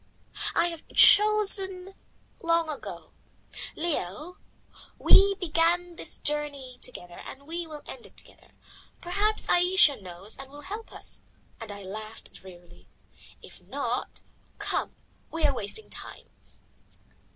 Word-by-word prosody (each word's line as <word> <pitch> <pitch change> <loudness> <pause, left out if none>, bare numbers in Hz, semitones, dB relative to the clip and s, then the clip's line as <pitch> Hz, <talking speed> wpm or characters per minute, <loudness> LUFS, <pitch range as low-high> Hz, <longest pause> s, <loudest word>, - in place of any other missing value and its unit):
"I 340 +1 +3
have 335 -2 -9
chosen 390 -3 +6 0.5
long 335 -1 +2
ago. 295 - -8 0.6
Leo, 310 - -3 0.6
we 395 0 +6
began 345 0 +1
this 325 - -4
journey 285 -4 -3
together 175 -8 -7
and 280 +1 -10
we 335 +2 -3
will 300 -2 -9
end 250 - -10
it - - -25
together. - - -14 0.5
Perhaps 410 +5 0
Ayesha 350 - +5
knows 185 +3 -7
and 270 0 -9
will 290 +1 -11
help 420 +7 -7
us," - - -10 0.4
and 225 -3 -7
I 200 0 -9
laughed 215 +3 -9
drearily. 175 -2 -15 0.6
"If - - -13
not - - -4 0.3
come, - - -2 0.3
we 325 -1 0
are 285 - +3
wasting 245 - -6
time." - - -8
315 Hz, 120 wpm, -27 LUFS, 235-360 Hz, 0.6 s, chosen